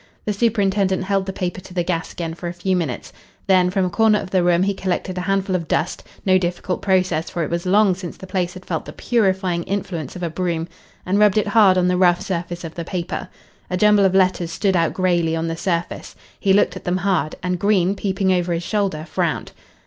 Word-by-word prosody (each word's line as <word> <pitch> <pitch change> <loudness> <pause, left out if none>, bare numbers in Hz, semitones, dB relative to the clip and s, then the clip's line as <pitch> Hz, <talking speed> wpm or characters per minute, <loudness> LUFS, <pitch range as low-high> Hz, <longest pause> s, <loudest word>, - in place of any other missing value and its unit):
The 210 - 0
superintendent 200 -3 +1
held 195 0 0
the - - -1
paper 185 -1 -4
to 185 0 -13
the 175 - +1
gas 170 -1 -2
again 165 -2 -4
for 175 +1 -6
a 170 - -4
few 185 +2 0
minutes. 160 -9 -3 0.3
Then 185 -2 +4
from 190 0 +1
a - - -1
corner 220 +2 +4
of 185 - -7
the 185 - +3
room 175 0 +3
he 200 +1 +1
collected 185 -1 -2
a 180 - -2
handful 195 -1 +1
of 170 -3 -2
dust 160 - -1 0.2
no 185 -1 +4
difficult 180 +1 -2
process, 185 -4 +1
for 170 - -2
it 155 - -4
was 170 +1 -2
long 200 +1 +4
since 180 -1 -7
the - - -10
place 185 -2 -2
had 185 - -11
felt 160 -3 -3
the - - -9
purifying 190 -6 0
influence 180 -7 -4
of 180 - -6
a 170 - -1
broom 170 -1 -2 0.4
and 195 +3 +1
rubbed 210 -1 +4
it 210 -1 +1
hard 200 -3 +5
on 180 0 +3
the 180 0 +2
rough 175 -1 +4
surface 175 -1 -4
of 165 -1 -6
the 170 - -5
paper. 180 +1 -4 0.4
A 180 - -1
jumble 210 +1 +5
of 190 -1 +3
letters 185 -3 +2
stood 195 +2 0
out 165 -2 +1
greyly 175 -3 +1
on 165 0 -2
the 165 - -2
surface. 170 0 -3 0.2
He 195 - +2
looked 200 - +3
at - - -8
them 180 0 0
hard, 180 -6 0
and 180 -1 -1
Green, 195 -2 +2
peeping 195 -1 0
over 175 -1 0
his 170 +1 -2
shoulder, 195 -7 -1
frowned. - - -2
185 Hz, 235 wpm, -21 LUFS, 175-195 Hz, 0.4 s, hard